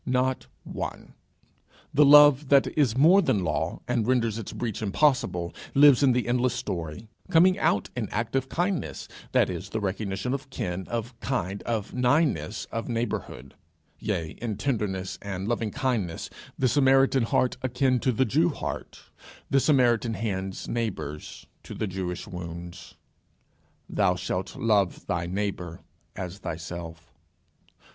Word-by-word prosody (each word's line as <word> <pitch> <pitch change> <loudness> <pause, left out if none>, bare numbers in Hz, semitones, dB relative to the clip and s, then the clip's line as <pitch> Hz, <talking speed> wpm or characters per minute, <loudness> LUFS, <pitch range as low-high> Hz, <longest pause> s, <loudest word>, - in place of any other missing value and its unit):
Not 130 0 0 0.2
one. - - -6 0.8
The 150 - +6
love 145 -1 +7
that 140 -1 +6
is 130 -6 +2
more 170 +8 +6
than 100 - +1
law, 75 -3 -2
and 120 -3 0
renders 115 -3 +1
its 110 - -6
breach 115 -4 -4
impossible, 100 - +1 0.2
lives 140 -2 +7
in 135 -3 +5
the 125 -1 0
endless 125 0 +1
story, 95 -3 -5 0.2
coming 185 +2 +5
out 100 - +1
in 115 -5 -3
active 120 +4 -2
kindness, 180 +1 -2 0.2
that - - +4
is, - - -5
the 110 - -2
recognition 100 +3 -2
of 140 -1 -5
kin, 95 -7 -4
of 120 +1 -4
kind, 100 -7 -2
of 110 -4 -2
nighness, 125 -2 +1
of 115 +1 -4
neighbourhood; 115 - -4 0.5
yea, 90 -7 -2
in 110 -4 -3
tenderness 95 -8 -2
and 95 -1 -4
loving 115 -1 -1
kindness 105 -8 -2 0.3
the 130 - +2
Samaritan 135 0 +4
heart 120 +2 +1
akin 130 0 +1
to 130 - +1
the 130 +3 +2
Jew 155 +9 +2
heart, 150 - -6 0.5
the 135 - +5
Samaritan 120 -5 +3
hands 95 -2 -3
neighbours 100 -11 -4 0.2
to - - -9
the - - -2
Jewish 90 -2 -4
wounds. 85 -1 -8 0.9
Thou - - +2
shalt - - -3
love 105 -5 +1
thy 85 -1 -2
neighbour 90 -3 -3 0.3
as 95 +1 -6
thyself. 85 -1 -7
115 Hz, 140 wpm, -26 LUFS, 95-130 Hz, 0.9 s, love